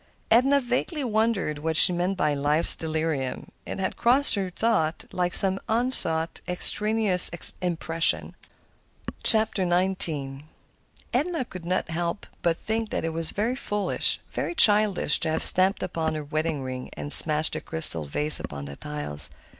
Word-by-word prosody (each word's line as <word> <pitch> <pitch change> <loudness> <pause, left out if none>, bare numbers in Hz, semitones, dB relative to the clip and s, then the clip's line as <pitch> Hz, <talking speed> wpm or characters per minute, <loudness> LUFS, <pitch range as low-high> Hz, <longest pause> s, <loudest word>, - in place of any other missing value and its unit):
Edna 265 +5 +3
vaguely 260 +5 -4
wondered 220 - -3
what 160 +1 -2
she 180 - +5
meant 180 +2 -3
by 150 -4 -1
"life's 145 +3 +3
delirium." 155 -4 -5 0.2
It - - -7
had 190 - -5
crossed 260 +4 +2
her 195 -3 -3
thought 180 -5 -3
like 180 -1 -2
some 195 0 +6
unsought, 220 -9 -1
extraneous 210 +1 +3 0.3
impression. 165 -2 -3 0.9
XIX 190 -5 +2 1.0
Edna 300 +2 -2
could 185 -7 -12
not 180 -2 -4
help 170 +4 -5 0.2
but 170 -1 -2
think 220 0 -5
that - - -5
it 165 - -5
was 165 0 -1
very 225 +5 -3
foolish, 210 -6 -2
very 345 - -5
childish, 210 - +2
to 160 - -3
have 160 - -3
stamped 190 +2 +4
upon 160 -3 -4
her 155 - -6
wedding 155 -1 -5
ring 130 -1 -8
and 145 - -1
smashed 155 0 +7
the - - -4
crystal 155 - 0
vase 150 - +7
upon 70 -1 -9
the 70 0 -10
tiles. 75 0 -6
175 Hz, 145 wpm, -23 LUFS, 155-215 Hz, 1.0 s, smashed